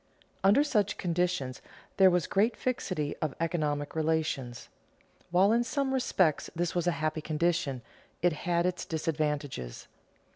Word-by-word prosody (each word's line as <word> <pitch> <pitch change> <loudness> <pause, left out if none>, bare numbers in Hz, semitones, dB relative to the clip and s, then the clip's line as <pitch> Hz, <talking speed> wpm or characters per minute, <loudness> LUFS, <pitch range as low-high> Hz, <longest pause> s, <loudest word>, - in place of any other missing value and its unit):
Under 205 +9 +6
such 210 -9 +1
conditions 175 -7 -1 0.4
there 190 -1 +7
was 180 -3 +1
great 215 +5 +1
fixity 185 - -2
of 155 -3 -3
economic 150 -3 -1
relations. 155 -6 -1 0.6
While 185 +4 +4
in 235 +1 +3
some 270 +1 -1
respects 185 - +1
this 175 0 -1
was 175 -1 0
a - - +4
happy 155 0 0
condition, 155 -5 0 0.4
it 175 -1 +2
had 170 +2 0
its 180 0 -1
disadvantages. 150 - -3
170 Hz, 135 wpm, -30 LUFS, 150-185 Hz, 0.6 s, there